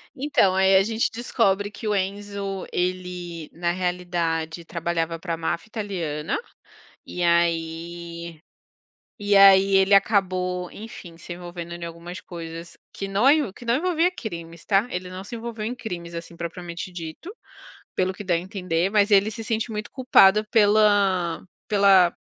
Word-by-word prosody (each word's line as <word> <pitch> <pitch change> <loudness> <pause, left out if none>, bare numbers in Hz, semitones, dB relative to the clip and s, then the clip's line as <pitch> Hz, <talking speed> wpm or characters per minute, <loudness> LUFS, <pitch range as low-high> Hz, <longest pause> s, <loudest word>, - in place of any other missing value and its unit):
Então, 270 -9 +2
aí 190 0 +4
a 190 - +6
gente 225 +2 0
descobre 205 -4 0
que 220 - -7
o 210 - +1
Enzo, 200 0 -3
ele 180 -2 -3
na 170 +1 -1
realidade 175 -2 -2
trabalhava 165 0 -2
para 170 0 -3
máfia 165 +5 -3
italiana, 170 -9 -3 0.7
e 180 - -4
aí 170 0 -1 0.8
e 205 0 +2
aí 195 0 +7
ele 195 +1 +4
acabou, 185 -3 +2
enfim, 200 -6 -10
se 175 +1 -8
envolvendo 175 -1 -8
em 170 0 -7
algumas 170 +2 -8
coisas 165 -1 -9 0.2
que 195 - -5
noio 255 +4 +3
que 240 - -13
não 235 0 +2
envolvia 345 +3 +2
crimes, 170 - -8
está, 200 +5 +2
ele 180 -3 -5
não 185 +1 -8
se 235 - -7
envolveu 230 -2 -5
em 240 +3 -3
crimes, 170 -7 -7
assim, 170 0 -8
propriamente 170 +1 -6
dito, 165 - -7 0.6
pelo 185 0 0
que 205 - -8
dá 185 -3 0
a - - +2
entender, 180 -1 -1
mas 205 0 +3
ele 200 +1 +5
se 225 +1 -7
sente 225 +1 -2
muito 210 -1 -5
culpado 215 -5 +5
pela 205 -5 +3 0.2
pela 195 -4 +5
185 Hz, 150 wpm, -24 LUFS, 170-205 Hz, 0.8 s, aí